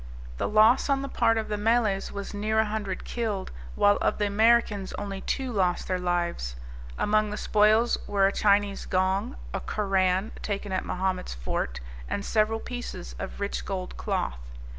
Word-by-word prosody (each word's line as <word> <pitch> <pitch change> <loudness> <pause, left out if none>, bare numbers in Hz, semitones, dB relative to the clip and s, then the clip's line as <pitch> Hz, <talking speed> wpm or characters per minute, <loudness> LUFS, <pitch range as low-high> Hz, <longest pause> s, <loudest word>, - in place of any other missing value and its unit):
The - - -1
loss 220 +6 +5
on 275 -1 +2
the - - -3
part 225 -4 +2
of 220 - -1
the 210 -1 -2
Malays 215 -3 +1
was 200 +1 -6
near 215 +2 -1
a 220 - +4
hundred 210 -3 -4
killed, 215 -5 -3 0.2
while 205 0 +4
of - - 0
the 205 - +1
Americans 210 -1 +3
only 195 -1 -5
two 265 -2 -2
lost 185 -5 0
their 185 -1 0
lives. 175 - -1 0.4
Among 215 0 +2
the 210 - -4
spoils 215 +3 +3
were 200 -1 +3
a 195 - +3
Chinese 200 -1 +2
gong, 185 - 0 0.2
a - - -1
Koran, 195 -1 0
taken 205 -1 -3
at 185 - 0
Mahomet's 185 - -2
fort, - - -3 0.3
and 200 - -2
several 220 0 +2
pieces 245 - -6
of - - -6
rich 200 0 -2
gold 185 -2 -4
cloth. - - -2
205 Hz, 170 wpm, -27 LUFS, 190-220 Hz, 0.4 s, loss